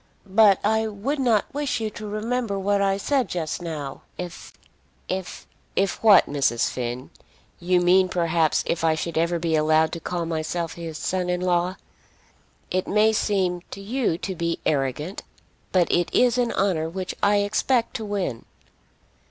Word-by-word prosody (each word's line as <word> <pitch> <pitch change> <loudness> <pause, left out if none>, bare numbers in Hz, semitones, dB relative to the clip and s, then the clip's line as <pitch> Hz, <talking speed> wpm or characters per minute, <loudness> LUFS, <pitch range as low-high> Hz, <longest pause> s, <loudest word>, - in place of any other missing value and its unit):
But 200 0 +5
I 220 +1 +2
would 220 +8 -3
not 235 -6 +1
wish 285 -3 -1
you 220 -1 -3
to 215 0 -8
remember 215 0 -2
what 200 +1 +1
I 195 0 +2
said 265 +5 0
just 165 -1 -3
now, 150 -5 -5 0.2
if 175 -1 -7 0.6
if 185 -1 -5 0.2
" - - -38
"If 195 0 0
what, 210 -4 +7
Mrs. 135 -5 0
Finn? 125 +1 -5 0.5
You 180 +1 +2
mean, 185 +1 +4
perhaps, 170 -3 +1
if 165 - -1
I 160 -1 +3
should 165 +1 -4
ever 170 +2 +1
be 165 -1 0
allowed 155 +1 +3
to 170 - -5
call 170 +1 -3
myself 165 +1 -3
his 165 -2 -7
son 180 +1 -2
in 180 0 0
law. 180 0 +1 1.0
It 185 0 0
may 215 +2 +3
seem 185 -4 0
to - - -8
you 215 -3 -1
to 190 - -4
be 170 -1 -2
arrogant, 145 +5 -1 0.5
but 180 -2 +3
it 175 -1 +2
is 250 0 +3
an 240 -1 +1
honour 170 -5 0
which 185 +2 -4
I 205 0 +4
expect 220 +4 +1
to 220 - -6
win." 195 - -3
185 Hz, 170 wpm, -24 LUFS, 165-210 Hz, 1.0 s, what